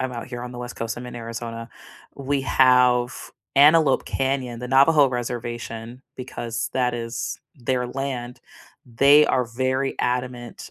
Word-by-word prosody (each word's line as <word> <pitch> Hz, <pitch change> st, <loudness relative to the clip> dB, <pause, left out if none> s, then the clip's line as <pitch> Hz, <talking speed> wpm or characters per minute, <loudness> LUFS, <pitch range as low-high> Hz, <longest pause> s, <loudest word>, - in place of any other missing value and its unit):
I'm 130 Hz, -1 st, -2 dB
out 120 Hz, -, -6 dB
here 120 Hz, -1 st, -6 dB
on 125 Hz, 0 st, -7 dB
the 120 Hz, -, -8 dB
West 125 Hz, 0 st, -7 dB
Coast. 115 Hz, 0 st, -4 dB
I'm 125 Hz, 0 st, -7 dB
in 120 Hz, -, -8 dB
Arizona. 115 Hz, 0 st, -6 dB, 0.5 s
We 140 Hz, 0 st, -2 dB
have 125 Hz, -2 st, +3 dB, 0.2 s
Antelope 150 Hz, -1 st, +5 dB
Canyon, 130 Hz, -3 st, -2 dB
the 125 Hz, -, -6 dB
Navajo 140 Hz, +2 st, +5 dB
reservation, 120 Hz, 0 st, -5 dB
because 120 Hz, -3 st, -5 dB
that 125 Hz, -2 st, 0 dB
is 115 Hz, 0 st, -4 dB, 0.2 s
their 125 Hz, 0 st, -1 dB
land. 125 Hz, -2 st, -5 dB, 0.5 s
They 140 Hz, +5 st, +5 dB
are 125 Hz, -, +1 dB
very 130 Hz, +3 st, -1 dB
adamant 125 Hz, -1 st, -3 dB
125 Hz, 145 wpm, -23 LUFS, 120-130 Hz, 0.5 s, Antelope